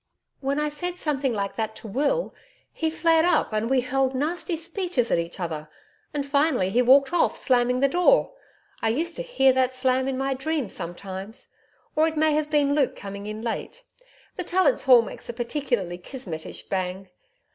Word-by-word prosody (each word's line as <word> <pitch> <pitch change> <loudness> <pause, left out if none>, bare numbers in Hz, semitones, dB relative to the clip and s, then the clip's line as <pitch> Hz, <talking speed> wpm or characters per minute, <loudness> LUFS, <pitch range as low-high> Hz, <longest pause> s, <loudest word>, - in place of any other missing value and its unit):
When 275 +1 -1
I 300 0 0
said 355 +4 -4
something 285 -5 -1
like 200 -3 -3
that 220 -1 -2
to - - -9
Will, 295 - 0 0.4
he 320 - -1
flared 325 0 +3
up 340 -9 +2
and 215 +2 0
we 265 -1 +3
hurled 265 +1 0
nasty 335 +6 -1
speeches 335 - -2
at - - +3
each 170 +3 -5
other, 155 -3 -4 0.4
and 290 -2 -2
finally 280 - +2
he 245 - +3
walked 270 +5 +5
off 350 - +2
slamming 250 -1 +2
the 275 - +5
door 360 - +3 0.5
I 225 - +1
used 330 +9 0
to - - -2
hear 270 - +3
that 255 0 +1
slam 255 0 +1
in 265 -1 -1
my 270 0 0
dreams 275 -3 -2
sometimes 190 +4 -7 0.5
or 315 +1 +4
it 320 -1 -3
may 310 0 +3
have 300 0 0
been 290 -2 +2
Luke 285 -3 +1
coming 200 +1 -7
in 215 +1 -6
late 360 - -4 0.5
the 365 - -2
Tallants' 375 +5 +2
hall 250 -3 +8
door - - -7
makes - - -11
a - - -3
particularly 235 - -2
Kismetish 180 - -7
bang. 185 0 -3
265 Hz, 190 wpm, -25 LUFS, 220-310 Hz, 0.5 s, hall